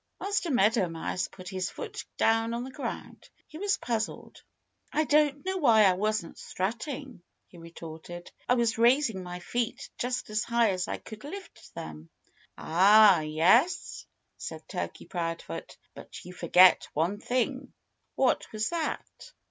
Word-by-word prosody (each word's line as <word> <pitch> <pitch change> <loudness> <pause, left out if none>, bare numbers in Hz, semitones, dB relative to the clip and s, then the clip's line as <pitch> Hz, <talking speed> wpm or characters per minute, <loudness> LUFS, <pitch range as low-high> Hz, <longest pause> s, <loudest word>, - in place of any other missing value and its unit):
Master 400 -3 -1
Meadow 220 - +3
Mouse 165 +2 -3
put 185 -1 -13
his 185 -2 -2
foot - - -7
down 225 +1 +2
on 240 - -3
the 260 - -8
ground. 280 - -7 0.2
He 315 - -10
was 400 0 +1
puzzled. 225 -2 -4 0.5
"I 310 - +2
don't 295 0 +2
know 380 0 -1
why 230 -10 +5
I 190 -2 +5
wasn't 210 -2 -2
strutting," 235 - -4 0.2
he 175 - -16
retorted. 165 +1 -10 0.2
"I 250 - +5
was 235 -2 +1
raising 240 -4 +3
my 180 0 -7
feet 240 +5 -3
just 245 -3 -2
as 215 0 0
high 235 -2 +2
as 185 -1 -2
I - - -3
could 215 -1 -11
lift 380 +7 -10
them." 80 +1 -8 0.5
"Ah, 195 +3 +6
yes?" 170 - +2 0.3
said - - -7
Turkey - - -5
Proudfoot. 165 - -5 0.2
"But - - -11
you 180 - -9
forgot 180 +1 +5
one 170 +7 0
thing." 255 +3 -2 0.4
"What 260 -2 +1
was 215 0 -1
that?" 335 -2 -4
220 Hz, 150 wpm, -28 LUFS, 180-255 Hz, 0.5 s, Ah